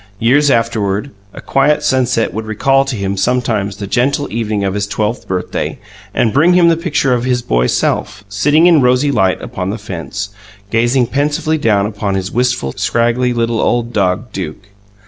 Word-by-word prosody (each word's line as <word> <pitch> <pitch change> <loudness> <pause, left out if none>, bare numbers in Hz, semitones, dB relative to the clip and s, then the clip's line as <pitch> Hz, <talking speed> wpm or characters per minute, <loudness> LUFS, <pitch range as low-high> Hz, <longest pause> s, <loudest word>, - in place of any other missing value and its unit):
Years 140 +7 +3
afterward, 115 -1 0 0.2
a - - -10
quiet 145 +2 +1
sunset 130 -3 +1
would 110 +1 -5
recall 135 +5 +2
to 135 -2 -3
him 100 -1 -2
sometimes 100 -2 -1
the 100 - -5
gentle 135 +7 0
evening 110 -3 -1
of 95 -1 -1
his 100 0 -2
twelfth 110 +2 -2
birthday, 90 -1 -3 0.3
and 110 - +1
bring 165 +6 +4
him 175 -2 +5
the 165 - +3
picture 160 -6 0
of 120 -1 0
his 125 -1 0
boy - - +1
self, 100 - -1
sitting 145 +11 +2
in 170 -4 +5
rosy 125 +3 +3
light 95 -7 +1
upon 90 0 -4
the 105 - -3
fence, 95 +2 -6 0.4
gazing 120 +3 +2
pensively 145 +4 -1
down 105 -7 +2
upon 105 -2 -3
his 95 +1 -3
wistful, 120 - 0
scraggly, 120 +2 +1
little 115 -1 0
old 120 0 0
dog, 100 +4 0
Duke. 95 +2 -7
115 Hz, 175 wpm, -15 LUFS, 100-130 Hz, 0.4 s, him